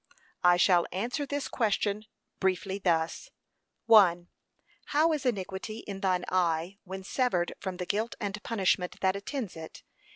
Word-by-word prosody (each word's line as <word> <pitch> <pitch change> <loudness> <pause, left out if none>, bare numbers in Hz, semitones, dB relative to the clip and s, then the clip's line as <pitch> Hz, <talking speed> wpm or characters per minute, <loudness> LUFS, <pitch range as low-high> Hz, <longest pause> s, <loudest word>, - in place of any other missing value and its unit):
I 175 0 +6
shall 175 -1 +4
answer 245 - -2
this 285 0 -2
question 210 -2 0 0.3
briefly 190 +1 0
thus: 170 - 0 0.6
(1.) 180 -6 +6 0.6
How 315 +3 +3
is 285 -4 -1
iniquity 200 0 -3
in 200 -2 -6
thine 185 -2 0
eye, 175 +1 0
when 190 +1 -7
severed 190 -5 0
from 190 -2 -5
the 180 - -4
guilt 215 +5 -1
and 205 0 -4
punishment 190 -5 0
that 190 0 +2
attends 210 0 -4
it? 160 -1 -10
195 Hz, 140 wpm, -29 LUFS, 180-220 Hz, 0.6 s, I